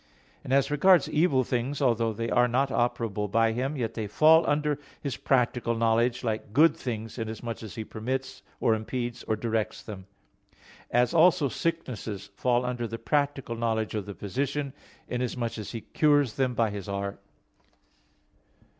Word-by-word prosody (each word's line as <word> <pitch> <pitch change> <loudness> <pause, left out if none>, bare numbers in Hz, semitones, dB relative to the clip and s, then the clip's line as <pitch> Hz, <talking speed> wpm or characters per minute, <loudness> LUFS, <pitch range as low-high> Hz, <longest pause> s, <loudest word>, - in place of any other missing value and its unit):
And, - - -6
as 135 +1 +3
regards 170 +1 +5
evil 150 -5 +2
things, 125 +3 -2
although 115 -4 +2
they 115 +2 -3
are 125 0 +4
not 130 +3 +1
operable 115 -5 -1
by 115 +2 +3
Him, 130 +6 -2
yet 115 -3 -2
they 110 -2 -3
fall 160 +9 +6
under 150 0 +1 0.2
His 140 -5 -3
practical 125 -2 +1
knowledge, 115 +2 +2
like 110 -2 -3
good 155 +6 +5
things, 115 -1 -5
inasmuch 115 +1 -5
as 110 -6 -8
He 110 - -4
permits, 130 +5 -4 0.2
or 115 - +3
impedes, 120 +2 -3
or 110 - 0
directs 110 0 -2
them; 95 -3 -9 0.8
as 125 +5 +2
also 165 -3 +5
sicknesses 110 - -4
fall 125 +3 +1
under 125 -1 -2
the 115 +1 -5
practical 140 0 -1
knowledge 110 -2 -1
of 105 -2 -3
the 100 - -6
physician, 140 +6 -3 0.3
inasmuch 125 -2 -3
as 105 - -6
he 115 - -5
cures 145 -4 +2
them 130 -2 0
by 115 -2 +1
his 100 -1 -6
art. 100 0 -4
120 Hz, 160 wpm, -27 LUFS, 110-135 Hz, 0.8 s, fall